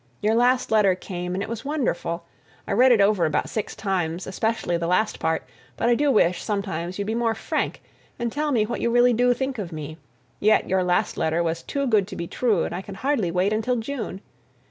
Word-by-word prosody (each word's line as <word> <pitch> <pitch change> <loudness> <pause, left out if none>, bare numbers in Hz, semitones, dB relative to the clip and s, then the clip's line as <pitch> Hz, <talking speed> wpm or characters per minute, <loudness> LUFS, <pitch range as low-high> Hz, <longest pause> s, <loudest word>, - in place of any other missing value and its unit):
Your 215 +1 +1
last 245 +2 +2
letter 205 -4 +4
came 180 -1 -5
and 195 - -2
it - - -5
was 230 +1 -5
wonderful! 230 - -2 0.4
I - - -3
read 250 +6 +5
it 235 - +5
over 200 -4 +3
about 155 - -1
six 215 - -3
times, 180 -4 -2
especially 220 -2 -1
the 170 0 -1
last 195 +5 +1
part, 160 0 0 0.3
but 235 - +1
I - - +5
do 285 +4 +2
wish, 180 -8 +3
sometimes, 185 -4 -3
you'd 200 - -2
be 220 - -2
more 230 -1 +1
frank 220 - -2 0.3
and 235 -1 -2
tell 300 +2 -1
me 225 -5 +2
what 235 - -4
you - - +1
really 245 +1 +4
do 245 +2 +3
think 265 -1 -3
of 185 -4 -5
me, 155 0 -7 0.4
yet 215 +1 +3
your 190 0 +2
last 180 0 0
letter 160 +2 +1
was 165 0 -2
too 280 0 -2
good 215 -6 +2
to - - -8
be 170 - -4
true, 215 -1 +1
and - - -3
I 180 - -3
can 195 0 -9
hardly 255 -4 0
wait 180 +4 +1
until 225 +3 0
June! 225 -5 -4
210 Hz, 225 wpm, -24 LUFS, 180-240 Hz, 0.4 s, read